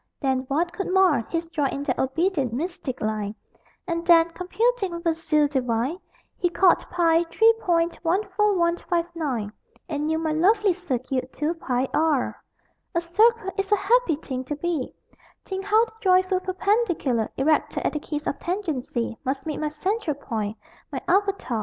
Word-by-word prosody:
Then 265 -2 0
what 335 +6 0
could 370 +1 -3
mar 370 -8 +4
His 330 0 -2
joy 295 -4 0
in 280 +1 -4
that 260 -4 -1
obedient 280 - 0
mystic 280 -1 -4
line; 215 -1 -2 0.5
And 335 -1 -2
then, 335 -1 +6
computing 390 +3 0
with 340 0 -7
a 330 - +3
zeal 305 -2 +2
divine, 260 +3 -1 0.4
He 355 - +2
called 360 0 +4
Ï 335 -1 +2
3 450 +1 +5
point 335 -1 +1
14159 340 - 0 0.3
And 300 -2 -2
knew 320 0 +1
my 320 -1 -1
lovely 395 +5 +3
circuit 260 -6 -3
2 305 +3 -1
Ï 260 -6 -1
r! 305 -4 +1 0.5
A - - +4
circle 420 +4 +2
is 390 +1 -2
a - - +7
happy 415 -3 +2
thing 260 -3 -5
to 295 - -3
be 310 -3 -2 0.5
Think 385 0 -4
how 435 +3 +4
the 455 - -16
joyful 370 -1 +3
perpendicular 370 - 0
Erected 305 +3 +1
at - - +1
the 300 - -2
kiss 300 0 -5
of 280 - -2
tangency 295 - -2
Must 270 +2 -2
meet 305 -2 -3
my 305 - -1
central 350 +2 -2
point, 220 -6 -4 0.3
my - - -3
avatar! 390 - +1
330 Hz, 160 wpm, -24 LUFS, 275-370 Hz, 0.5 s, a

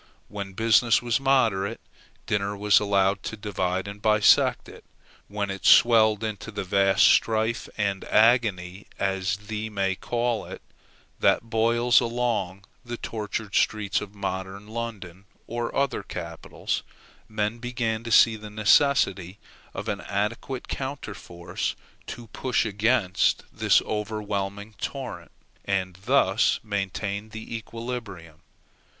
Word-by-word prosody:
When 100 -2 -6
business 115 +2 +4
was 120 0 +1
moderate, 115 -6 +1 0.5
dinner 100 0 -1
was 105 0 +4
allowed 100 -1 +1
to 110 - -6
divide 95 -2 -2
and 100 0 -8
bisect 105 -1 +4
it. - - -13 0.4
When 100 -1 -3
it 95 - -7
swelled 110 -2 +6
into 110 0 -4
that 100 -2 -4
vast 95 +1 +3
strife 110 +1 +2
and 100 -2 -1
agony, 105 -5 +2
as 95 -1 -1
one 105 +1 -5
may 95 -1 +1
call 120 +3 -2
it, - - -10 0.6
that 115 - +2
boils 120 +2 +4
along 115 -6 -2 0.2
the 120 -1 -6
tortured 105 -2 -5
streets 105 -2 +1
of 105 0 -9
modern 95 +1 -5
London 105 -5 -6 0.2
or 120 0 -4
other 140 -1 0
capitals, 85 -1 -5 0.5
men 110 +1 -2
began 115 -2 -2
to 115 - -6
see 110 0 +6
the 105 -1 -9
necessity 105 -4 +2 0.4
of - - -5
an - - -2
adequate 105 +6 -3
counterforce 100 -10 -5 0.3
to 120 - -7
push 125 0 0
against 105 -2 +1
this - - +3
overwhelming 105 -1 -4
torrent, 125 -11 -5 0.3
and 95 -2 -1
thus 120 -5 +3
maintain 100 0 -3
the 110 +1 -7
equilibrium. 110 -8 -7
105 Hz, 120 wpm, -25 LUFS, 100-115 Hz, 0.6 s, swelled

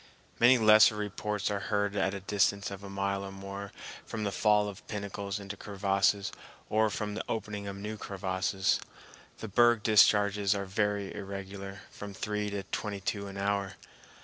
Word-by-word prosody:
Many 125 +2 +7
lesser 110 -1 +7
reports 105 0 -2
are 100 - -1
heard 100 -1 +1
at 95 0 +1
a 100 - -6
distance 100 0 +1
of 100 0 -8
a 100 - -7
mile 100 0 -1
or 100 - -6
more 100 +1 -7 0.3
from 110 - -5
the 100 - -1
fall 105 0 +3
of 100 -2 -9
pinnacles 100 -1 -4
into 100 0 -7
crevasses 100 0 +1 0.4
or 110 0 +3
from 105 0 -3
the 110 - -3
opening 105 -2 -3
of 100 - -5
new 105 +2 -5
crevasses. 95 -1 0 0.6
The 110 - -6
berg 120 +1 +4
discharges 105 -1 +5
are 100 0 -2
very 100 0 -1
irregular, 100 0 -7
from 100 -1 -8
three 105 +1 -2
to 100 -1 -4
twenty 100 +1 -4
two 100 +1 -3
an 100 0 -8
hour. 100 -1 -1
100 Hz, 170 wpm, -30 LUFS, 100-105 Hz, 0.6 s, Many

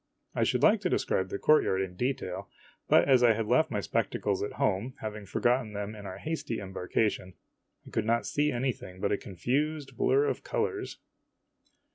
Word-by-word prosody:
I - - +1
should - - +1
like 215 0 +5
to 180 - 0
describe 95 - 0
the - - -3
courtyard 150 -10 +3
in 95 -2 -3
detail, 130 +7 -3 0.4
but - - +5
as 130 -3 +5
I 120 -2 +6
had 110 0 -2
left - - +3
my - - -1
spectacles 100 -2 -1
at 105 - -3
home, 105 +6 0
having 110 -2 -6
forgotten 120 +2 +1
them 105 +1 -4
in 105 -2 -9
our 95 0 -6
hasty 155 -3 -3
embarkation, 95 0 -2 0.5
I - - -12
could 110 - -1
not 115 +1 +1
see 150 +1 +1
anything 120 -7 -3
but 100 - 0
a - - +2
confused 135 - -2
blur 420 - +3
of 435 - -2
colors. 445 -5 -2
115 Hz, 180 wpm, -29 LUFS, 100-145 Hz, 0.5 s, I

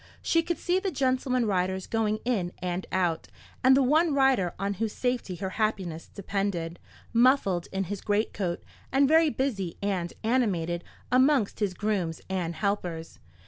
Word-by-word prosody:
She 330 - +3
could 340 +1 -2
see 360 +1 +1
the 385 - -1
gentleman 255 -4 +1
riders 190 -2 0
going 215 -1 0
in 195 -8 0
and 180 0 -3
out, 175 -3 0 0.4
and 260 +1 +7
the 275 - +4
one 305 +3 +3
rider 265 -10 +3
on 200 +2 -1
whose 220 -2 0
safety 245 -7 -2
her 190 +1 -4
happiness 185 -7 -1
depended, 195 -4 -3 0.3
muffled 230 -8 +3
in 195 0 -1
his 195 +1 -5
greatcoat, 205 -4 -1 0.3
and 275 +1 +4
very 320 +2 +5
busy 225 - -2
and 190 -4 -1
animated 185 -8 0 0.3
amongst 260 -3 +3
his 200 -4 -1
grooms 190 -7 -1
and 175 -3 -2
helpers. 180 -5 -3
205 Hz, 150 wpm, -27 LUFS, 180-255 Hz, 0.4 s, and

